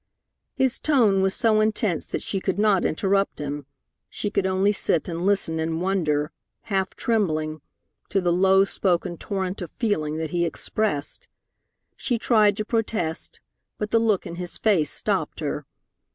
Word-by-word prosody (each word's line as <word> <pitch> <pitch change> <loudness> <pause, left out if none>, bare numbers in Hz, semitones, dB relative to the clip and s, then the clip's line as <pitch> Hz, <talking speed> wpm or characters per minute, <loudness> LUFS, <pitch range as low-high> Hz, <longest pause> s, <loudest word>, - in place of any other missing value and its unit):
His 265 -2 +1
tone 230 -10 +3
was 190 0 +1
so 220 -2 +3
intense 215 -5 0
that - - -4
she 195 - -2
could 190 0 -2
not 205 -3 +3
interrupt 195 +4 +1
him; 145 -1 -5 0.4
she 205 - -3
could 190 - +1
only 190 +2 +2
sit 175 -5 +1
and 170 +1 -2
listen 190 -5 +2
in 160 0 -1
wonder, 165 -5 0 0.3
half 190 -2 -2
trembling, 155 -9 0 0.5
to 195 - +2
the 175 -2 +1
low 190 +2 +5
spoken 175 -3 0
torrent 190 +2 -3
of 175 - -5
feeling 155 -10 -1
that 160 -1 -3
he 175 -1 +1
expressed. 205 - -2 0.7
She 245 - -1
tried 215 -3 +3
to 215 - -2
protest, 210 -8 -2 0.4
but 210 0 -4
the 230 - +4
look 220 -4 +1
in 170 - -7
his 180 -1 -5
face 185 -9 +2
stopped - - -2
her. - - -3
190 Hz, 160 wpm, -24 LUFS, 165-210 Hz, 0.7 s, low